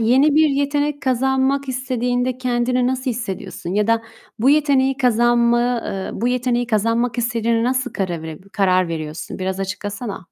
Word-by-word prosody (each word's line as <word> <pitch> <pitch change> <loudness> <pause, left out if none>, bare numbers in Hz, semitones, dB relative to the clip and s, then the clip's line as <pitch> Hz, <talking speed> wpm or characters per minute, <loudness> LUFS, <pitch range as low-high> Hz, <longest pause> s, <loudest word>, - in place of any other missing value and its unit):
yeni 265 +6 +4
bir 310 0 +5
yetenek 285 +1 0
kazanmak 265 +2 +1
istediğinde 250 -1 -1
kendini 250 0 0
nasıl 255 0 -1
hissediyorsun 195 -5 -5
ya 210 0 +2
da 230 0 +2 0.4
bu 255 +5 +4
yeteneği 275 -3 +3
kazanma 240 -1 +2
eee, 195 -1 -4
bu 240 - -1
yeteneği 245 -1 0
kazanmak 230 +2 0
istediğine 230 -1 0
nasıl 255 +1 0
karav 175 -4 -3 0.3
karar 185 -3 +2
veriyorsun? 155 +1 -5
Biraz 190 +1 -3
açıklasana. 205 +1 -5
245 Hz, 140 wpm, -20 LUFS, 215-260 Hz, 0.4 s, bir